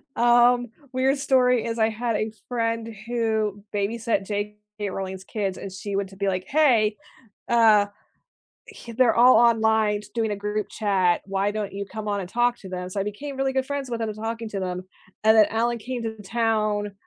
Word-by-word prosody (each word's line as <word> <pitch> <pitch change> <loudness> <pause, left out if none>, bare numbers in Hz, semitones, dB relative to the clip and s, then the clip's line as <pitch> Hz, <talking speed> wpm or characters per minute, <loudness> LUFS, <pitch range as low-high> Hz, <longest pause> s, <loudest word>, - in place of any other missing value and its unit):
um, 240 +1 +4 0.3
weird 265 +2 +2
story 250 -4 +3
is, 230 0 -3
I 220 0 +4
had 230 0 -2
a 215 +1 -1 0.2
friend 230 -2 -1 0.2
who 220 -4 -1
babysat 210 0 -1
J.K. 210 0 -5
Rowling's 190 0 -5
kids, 195 -2 -3
and 195 - -7
she 195 +1 -5
went 195 -1 -1
to 195 - -14
be, 200 0 -1
like, 185 -1 -1
"Hey, 235 -8 +3 0.5
uh, 220 -3 +5 0.8
he 420 - -11
they're 240 0 +3
all 245 +2 +7
online 220 -3 +3
doing 225 -2 0
a - - -2
group 210 +1 -3
chat, 190 -5 +1
why 195 +1 0
don't 205 -1 -4
you 200 +1 -4
come 215 +1 -6
on 205 -1 -1
and 180 - -6
talk 240 +3 +1
to 190 - -10
them?" 180 0 -5
So 200 - -4
I - - 0
became 270 +8 -6
really 270 0 0
good 265 0 0
friends 280 -2 -4
with 235 -1 -3
them, 220 -1 -2
talking 225 +1 -4
to 195 -2 -3
them, 180 0 -4 0.4
and 220 +1 +6
then 215 -1 +7
Alan 235 +2 0
came 245 +2 -5
to 220 -1 -5
town 215 -1 0
220 Hz, 195 wpm, -24 LUFS, 205-235 Hz, 0.8 s, all